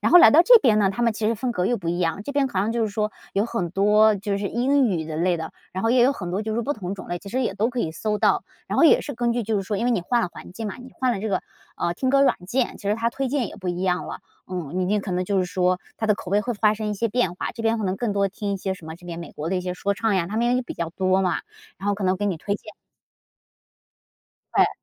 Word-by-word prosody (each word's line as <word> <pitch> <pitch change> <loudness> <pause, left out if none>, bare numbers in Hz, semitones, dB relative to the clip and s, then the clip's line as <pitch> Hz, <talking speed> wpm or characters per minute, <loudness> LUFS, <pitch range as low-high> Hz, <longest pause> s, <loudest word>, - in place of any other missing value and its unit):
然 - - +1
后 355 - +10
来 345 - +9
到 325 +4 +7
这 485 +5 +8
边 225 - +3
呢， 195 -2 +3
它 240 +5 -3
们 230 -1 +3
其 215 0 -2
实 230 - +2
风 245 +3 -2
格 180 -5 -1
又 240 - +1
不 170 -5 -5
一 175 +1 -1
样， 170 +2 -1
这 285 - -4
边 280 -1 +2
好 210 -7 -3
像 210 +4 0
就 235 - -1
是 220 - +1
说 210 0 -2 0.2
有 200 +2 +2
很 185 -8 -2
多， 210 +3 +4
就 200 0 -2
是 200 0 -2
英 260 +3 +2
语 170 -6 -1
的 155 0 -5
类 175 +2 +2
的， 160 -1 -6 0.2
然 190 +3 -3
后 225 - +3
也 245 0 +5
有 260 +3 +5
很 175 -10 -6
多 195 +4 -1
就 220 - -3
是 220 - -2
说 235 - 0
不 290 - 0
同 195 -6 -5
种 190 - -9
类， 175 - -2
其 200 - -11
实 255 +5 -1
也 225 - -1
都 210 +4 +1
可 250 - -5
以 160 -7 -1
搜 210 +4 -2
到。 - - +3 0.2
然 - - -2
后 - - +5
也 325 - +6
是 285 - -5
根 240 0 0
据 240 0 -1
就 215 0 0
是 195 - 0
说 200 +2 -2
因 230 - -1
为 245 - +2
你 210 - +1
换 235 +7 +1
了 180 - -1
环 - - -11
境 220 +4 -5
嘛， 205 - -4
你 255 +1 -12
换 255 -1 +1
了 195 - -3
这 220 - -2
个， 190 - 0 0.3
呃， 170 - 0
听 260 +9 -1
歌 275 0 +5
软 275 - +4
件， 245 +5 0
其 200 - -4
实 205 - +3
它 230 +1 0
推 270 +2 -2
荐 265 -2 0
也 - - -11
不 185 - -5
一 175 +1 -2
样 180 -1 0
了， - - -7 0.3
嗯。 180 -5 -4
明 185 - +1
天 210 0 +2
可 195 - -6
能 180 +1 0
就 195 +1 0
是 185 - +2
说 180 0 +1 0.2
它 220 - -2
的 210 - +4
口 185 - -8
味 205 +1 +3
会 240 +2 -2
发 210 0 +3
生 215 0 -3
一 210 - -1
些 230 +3 -1
变 205 -6 0
化， - - -3
这 230 - -7
边 225 0 +2
可 215 - -2
能 185 0 -1
更 230 0 -1
多 200 0 +1
听 200 +1 -4
一 - - -1
些 190 0 -2
什 175 -4 -13
么 160 - -6
这 175 +1 -17
边 170 -1 -6
美 170 - -8
国 155 +2 -5
的 190 - +1
一 180 - 0
些 180 0 -4
说 200 +2 -1
唱 215 +1 0
呀， 175 -3 +1
它 210 - -4
们 240 +2 +2
也 255 - 0
比 245 - -7
较 170 -1 -3
多 185 +2 +1
嘛， 185 -2 0 0.4
然 200 - -3
后 205 - +2
可 200 -1 -4
能 185 0 +2
给 205 - -3
你 190 - 0
推 200 +5 -2
荐。 215 +1 -9 1.8
对。 - - +5
205 Hz, 360 characters per minute, -24 LUFS, 185-235 Hz, 1.8 s, 后